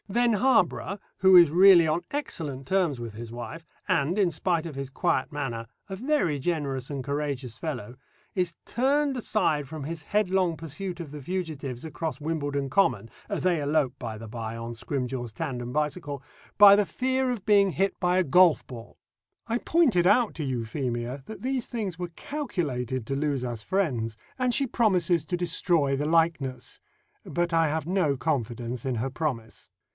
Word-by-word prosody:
Then 240 +3 +2
Harborough, 205 -3 +2 0.2
who 190 -1 +7
is 170 -4 +7
really 180 -1 +7
on 155 +3 +1
excellent 155 - -4
terms 180 -9 +1
with 115 -2 -6
his 115 +1 -8
wife, 120 +8 -7 0.2
and, 155 +8 +1
in 195 -4 +3
spite 170 +1 0
of 165 - -5
his 135 -1 -4
quiet 150 -1 0
manner, 120 -6 -4 0.2
a 195 - -5
very 235 - +1
generous 140 -4 -2
and 140 -2 -3
courageous 140 -4 -3
fellow, 125 -7 -5 0.4
is 180 -3 0
turned 275 +3 +1
aside 160 - 0
from 155 -3 -6
his 160 +3 -5
headlong 185 -4 +1
pursuit 170 +4 -6
of 160 -5 -7
the 150 -1 -8
fugitives 150 -6 -4
across 160 -2 -4
Wimbledon 145 -3 -2
Common 125 - +2 0.2
they 175 -4 +1
elope, 145 -3 +1
by 115 -3 -5
the 115 +1 -9
bye, 115 0 -5
on 115 +1 -5
Scrimgeour's 125 0 -4
tandem 120 +2 -4
bicycle 150 -1 -2 0.4
by 205 -1 +10
the 205 0 +3
fear 260 +8 0
of 225 -6 -5
being 200 -2 +5
hit 195 +2 0
by 180 0 +2
a 185 - +4
golf 175 +1 +5
ball. 115 -3 -10 0.5
I 235 +1 0
pointed 250 - +3
out 220 +3 +4
to 160 - -4
Euphemia 125 0 -3
that 220 - -9
these 260 -2 -1
things 205 -8 -4
were 175 -1 -4
calculated 135 - -3
to 135 - -2
lose 140 -3 -1
us 120 -3 -4
friends, 120 - -1 0.2
and 255 -1 +1
she 275 +1 +1
promises 180 -9 +2
to 180 +2 -2
destroy 165 -4 +1
the 145 +2 -1
likeness; 155 -6 0 0.4
but 175 0 -2
I 165 -1 +4
have 155 0 -2
no 175 -7 +1
confidence 120 -4 -2
in 130 -2 -1
her 125 +4 -2
promise. 125 -7 -4
155 Hz, 170 wpm, -27 LUFS, 130-190 Hz, 0.5 s, by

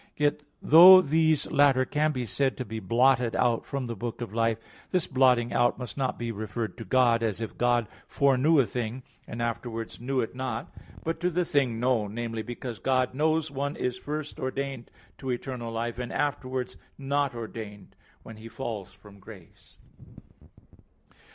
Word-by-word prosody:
Yet 150 0 +1 0.2
though 180 +4 +10
these 160 0 +2
latter 135 -2 +4
can 150 +3 +1
be 125 -4 -3
said 135 +5 0
to 130 - -4
be 110 +2 -5
blotted 120 +3 +2
out 120 -2 0
of 140 -2 -2
the 120 -1 -5
book 115 +3 -5
of 115 -4 -6
life, 115 -1 +1 0.3
this 180 -3 +1
blotting 125 -3 +3
out 120 0 +2
must 125 -2 -6
not 130 -2 -2
be 120 -1 -3
referred 110 +1 -4
to - - -5
God, 120 +1 +3
as 110 -3 -1
if 110 -5 -5
God 120 -1 +2 0.2
foreknew 140 +3 +3
a 135 - +4
thing, 120 +2 -4 0.2
and 120 +1 -4
afterwards 115 -1 -4
knew 130 +2 -1
it 115 - -2
not; 125 -3 -5 0.3
but 165 0 -3
to 175 +1 +1
the 180 0 0
thing 130 -7 0
known, 115 -4 0
namely, 115 -1 -3
because 120 -1 -7
God 130 +2 +1
knows 155 +2 +1
one 140 +1 -3
is 125 0 -3
first 150 +1 -5
ordained 135 -1 -4 0.3
to 135 - -6
eternal 120 -1 -4
life, 115 +1 -3
and 125 -1 -4
afterwards 130 -3 -2 0.2
not 140 -1 -1
ordained 110 -3 -8 0.3
when 115 - -11
he 110 +1 -10
falls 110 -7 -6
from 100 -1 -16
grace. 95 -3 -15
125 Hz, 170 wpm, -27 LUFS, 115-140 Hz, 0.3 s, though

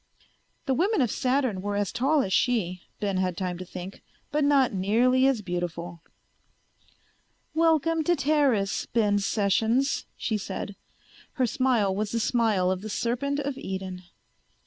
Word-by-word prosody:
The 270 - +1
women 385 - +1
of 240 -5 +1
Saturn 255 -7 0
were 205 +1 -2
as 205 -2 -1
tall 275 +3 +2
as 190 - -2
she, 185 -8 +1 0.2
Ben 200 -3 -1
had 185 -2 -1
time 180 -2 -3
to 185 - -6
think, 185 +2 -8 0.3
but 300 0 +1
not 280 -4 +3
nearly 240 +7 +3
as 250 -6 +1
beautiful. 175 -2 -4 1.5
"Welcome 325 0 +2
to 350 - +3
Teris, 275 -11 +1
Ben 210 -3 +2
Sessions," 220 +6 +1
she 220 -2 -1
said. 195 +1 -5 0.6
Her 260 -4 +1
smile 235 -5 +1
was 210 +1 -2
the 230 - +1
smile 215 -6 +2
of 185 0 -2
the 215 - -6
serpent 270 +7 -1
of 275 -1 -4
Eden. 190 -1 -5
220 Hz, 145 wpm, -26 LUFS, 190-270 Hz, 1.5 s, not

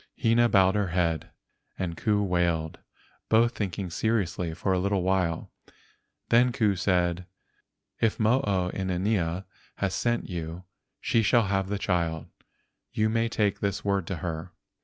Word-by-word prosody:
Hina 120 +1 +4
bowed 95 -2 +4
her 105 -2 0
head 85 -2 0 0.5
and 85 -3 -3
Ku 105 +3 +1
wailed, 85 -4 0 0.5
both 115 +2 +4
thinking 95 -2 -3
seriously 90 -4 -1
for 95 +2 0
a 90 - +1
little 100 0 0
while. 90 -3 0 0.8
Then 120 +2 +5
Ku 110 -5 +1
said: 90 -1 0 0.7
"If 115 -2 +1
Mo 115 +4 +3
o 90 -3 +1
inanea 95 -1 -1 0.3
has 95 -2 -1
sent 120 0 0
you 85 -1 -5 0.4
she 115 - +2
shall 115 +2 +4
have 95 -1 -1
the 100 - -1
child. 85 -4 -1 0.7
You 110 0 +1
may 115 +1 +1
take 105 -3 0
this 100 -1 -2
word 100 -4 0
to 95 - -2
her." 85 +1 -4
95 Hz, 145 wpm, -27 LUFS, 90-105 Hz, 0.8 s, Then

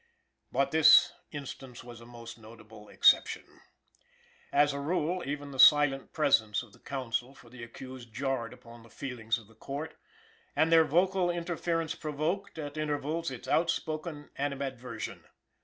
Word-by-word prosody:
But 140 0 +1
this 160 -1 +7 0.2
instance 135 -4 -8
was 120 -1 -11
a 115 - -13
most 115 -1 -10
notable 110 -1 -14
exception. - - +4 1.1
As 145 0 +4
a 140 - -4
rule, 170 +4 -1
even 145 0 -4
the 135 - -9
silent 145 -1 +6
presence 115 -8 +2
of 110 -4 -17
the - - -19
counsel 130 -1 -4
for 120 - -17
the 125 -1 -11
accused 125 0 -10
jarred 130 -1 -2
upon 115 0 -14
the 115 - -17
feelings 115 -2 -3
of 115 - -13
the 115 - -20
Court, 140 +7 -6 0.6
and 160 +1 +3
their 165 -1 +7
vocal 180 +4 +2
interference 170 -2 -2
provoked, 160 +7 -3
at 145 -1 -6
intervals, 155 +2 -2
its 130 -3 -8
outspoken 155 -2 -1
animadversion. 135 -4 -4
140 Hz, 145 wpm, -30 LUFS, 120-155 Hz, 1.1 s, this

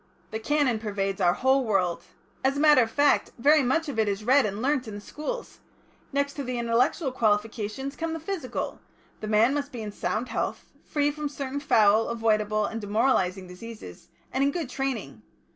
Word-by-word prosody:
"The 220 - -3
Canon 265 -1 +1
pervades 200 -3 -2
our 175 -1 +4
whole 265 +1 +3
world. 190 -6 0 0.4
As 270 +1 +2
a - - -1
matter 300 -3 +6
of 225 - +1
fact, 285 +4 +2
very 295 +5 +5
much 310 +6 +1
of 265 -6 -3
it 220 - +3
is 200 +1 -3
read 260 +1 +4
and 200 +1 -5
learnt 260 0 0
in 215 - -6
the - - -6
schools.... 305 - -6 0.5
Next 280 0 0
to 285 - -5
the 250 -1 -3
intellectual 240 +5 +1
qualification 220 +2 -1
comes 325 +3 -4
the 325 - -4
physical, 325 -5 -4 0.4
the 215 - -5
man 220 +5 +4
must 285 0 -2
be 240 -4 -6
in 210 - -5
sound 215 +3 -2
health, - - -3 0.2
free 290 -1 +1
from 295 0 -4
certain 280 -1 -4
foul, 220 -5 +4
avoidable, 215 -2 +1
and 225 +1 -4
demoralising 205 -4 +1
diseases, 215 +5 -10 0.3
and 265 - +2
in 280 - +3
good 290 -3 -4
training. 235 - -3
245 Hz, 190 wpm, -26 LUFS, 215-280 Hz, 0.5 s, matter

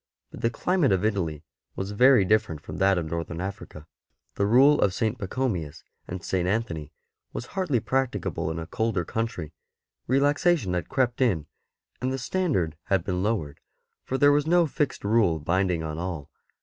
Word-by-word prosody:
But - - -10
the 115 - +2
climate 180 +4 +1
of 95 +1 +2
Italy 85 -8 -1 0.3
was 95 +1 -4
very 125 0 +5
different 110 -6 +1
from - - -8
that 95 -1 +3
of 85 - -1
Northern 85 +1 -4
Africa; 95 -5 -6 0.5
the 100 - 0
Rule 135 +6 +6
of 95 -2 +2
St. 110 0 0
Pachomius 95 - -3 0.2
and 90 0 -6
St. 90 -2 0
Anthony 85 -8 -2 0.4
was 120 - -4
hardly 180 -11 +1
practicable 105 -11 -1
in 80 - -4
a 80 - -4
colder 100 -1 -1
country; 110 -7 -3 0.5
relaxation 145 - +2
had 90 -1 -2
crept 130 -2 0
in 95 - +2 0.6
and 130 +1 0
the 135 - -1
standard 125 - -1
had 95 -3 +1
been 90 -1 -2
lowered, 95 -9 -1 0.4
for 130 - -2
there 145 +1 +6
was 145 +1 +2
no 175 +1 +4
fixed 150 -1 -2
rule 100 -5 +3
binding 85 +2 0
on 80 0 -4
all. 85 -5 -5
100 Hz, 170 wpm, -26 LUFS, 85-130 Hz, 0.6 s, Rule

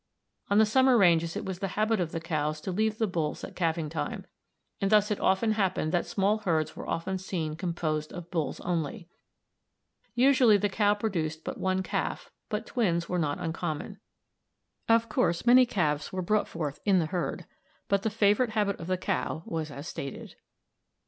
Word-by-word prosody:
On 200 - +3
the 220 - +7
summer 260 +3 +4
ranges 170 -4 +4
it - - -4
was 190 -2 -4
the 195 - -1
habit 215 0 +2
of 170 -3 -1
the 165 - -3
cows 155 -2 -2
to 190 - -4
leave 215 +3 0
the 220 - +2
bulls 165 -6 -2
at - - -8
calving 165 -2 0
time, 160 - -4 0.6
and 195 - +2
thus 210 0 +4
it 210 - 0
often 190 +4 +2
happened 190 -7 0
that 175 - 0
small 205 +2 +1
herds 165 -7 0
were - - -7
often 185 +3 -2
seen 165 -5 -3
composed 160 -3 -2
of 175 -1 -9
bulls 160 -6 -2
only. 170 0 -3 1.1
Usually 250 -4 +5
the 205 +1 0
cow 205 +1 +2
produced 165 -7 -2
but - - -5
one 190 0 0
calf, - - -3 0.2
but 215 +1 -2
twins 170 -10 0
were 180 - -1
not 145 -3 0
uncommon. 170 +3 -4 0.9
Of 230 0 +4
course 170 -5 0
many 250 +1 +7
calves 150 -8 0
were 185 -1 -3
brought 210 +4 +1
forth 150 -4 -4
in 200 -2 +4
the 170 - +2
herd, 175 +2 -3 0.4
but 200 -1 +2
the 220 - 0
favorite 215 +2 +2
habit 205 -2 0
of 165 - -7
the 185 0 0
cow 165 -2 -2
was 160 -2 -3
as 145 +2 -8
stated. 140 -5 -7
185 Hz, 185 wpm, -28 LUFS, 165-210 Hz, 1.1 s, the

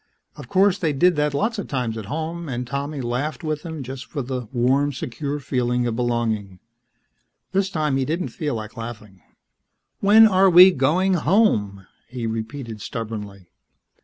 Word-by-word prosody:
Of - - -11
course, 195 0 +3
they 160 -4 0
did 175 +5 +3
that 150 -1 +1
lots 220 +10 -1
of 200 - -5
times 125 -5 -2
at 110 -2 -6
home 160 +4 -4
and 125 -1 -3
Tommy 140 +2 -4
laughed 130 +7 -3
with 155 -1 -2
them 160 -4 -6
just 130 0 -8
for 145 -4 -4
the 125 -2 -4
warm, 135 +3 +2
secure 140 +2 -4
feeling 125 -2 -1
of 120 -2 -1
belonging. 115 -5 -1 0.9
This 190 0 +1
time 155 -6 0
he 135 - +1
didn't 165 +6 -2
feel 150 -6 -3
like 110 -1 -7
laughing. 110 -5 -9 0.8
"When 215 +3 +7
are 190 -1 +4
we 180 +2 +9
going 175 +7 +2
home?" 150 - +1 0.2
he 125 -2 -5
repeated 115 0 -5
stubbornly. 105 -5 -7
135 Hz, 160 wpm, -22 LUFS, 115-165 Hz, 0.9 s, we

